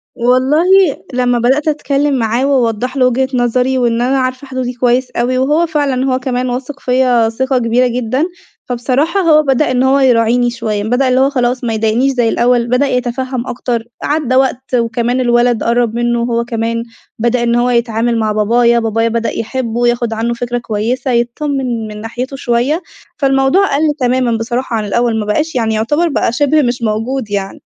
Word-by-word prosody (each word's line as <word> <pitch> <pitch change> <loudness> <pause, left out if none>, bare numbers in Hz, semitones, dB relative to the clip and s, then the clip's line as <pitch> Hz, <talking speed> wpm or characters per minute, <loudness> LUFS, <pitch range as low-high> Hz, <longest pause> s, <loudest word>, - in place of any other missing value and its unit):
والله 255 +7 +2 0.5
لمّا 245 -1 +1
بدأت 265 +6 +1
أتكلّم 290 -1 0
معاه 230 +3 0
واوضّح 255 -1 0
له 255 - +3
وجهة 260 +1 0
نظري، 250 +1 +1
وإن 235 -2 +1
أنا 265 +2 +1
عارفة 255 +1 -3
حدودي 255 -1 -3
كويس 250 +1 0
أوي، 250 +2 -1
وهو 295 +6 +2
فعلًا 285 -5 0
هو 255 - 0
كمان 255 -1 -2
واثق 265 +3 -5
فيّا 250 -3 +2
ثقة 260 +3 -1
كبيرة 245 +1 +2
جدًا، 250 +4 -1 0.4
فبصراحة 260 +9 0
هو 315 -4 +5
بدأ 270 -1 +1
إن 255 0 +1
هو 270 +1 +3
يراعيني 245 -1 +3
شوية، 220 -3 -3
بدأ 245 +5 +1
اللي 255 0 +2
هو 270 +1 +3
خلاص 250 -2 -1
ما 230 -2 -1
يضايقنيش 225 +5 +1
زي 240 -3 +1
الأول، 240 0 +1
بدأ 250 +3 +2
يتفهّم 250 0 -2
أكتر، 240 -2 -3 0.2
عدّى 290 -4 0
وقت 260 0 0
وكمان 235 +1 0
الولد 240 -2 +2
قرّب 235 -1 +1
منه 240 0 0
هو 235 0 -1
كمان، 230 0 -2 0.4
بدأ 235 +1 +1
إن 235 0 +1
هو 240 +1 +2
يتعامل 235 -1 0
مع 215 -1 0
بابايا، 235 +3 +2
بابايا 225 0 0
بدأ 230 0 -1
يحبه 240 0 -2
ياخد 240 -1 0
عنه 230 +2 -1
فكرة 245 0 -3
كويسة، 240 +3 -2
يتطمّن 240 -1 -1
من 210 0 -8
ناحيته 245 +4 -5
شوية، 265 +6 0 0.4
فالموضوع 270 +6 +2
قَل 290 - 0 0.2
تمامًا 250 -2 +1
بصراحة 240 +2 -3
عن 215 -1 -2
الأول، 230 +2 0
ما 210 - -3
بقاش 300 +10 -1
يعني 225 -3 0
يعتبر 295 +11 +1
بقى 280 - 0
شبه 290 +5 +2
مش 245 -2 -1
موجود 225 +2 -2
يعني. 195 -1 -4
245 Hz, 175 wpm, -14 LUFS, 235-260 Hz, 0.5 s, هو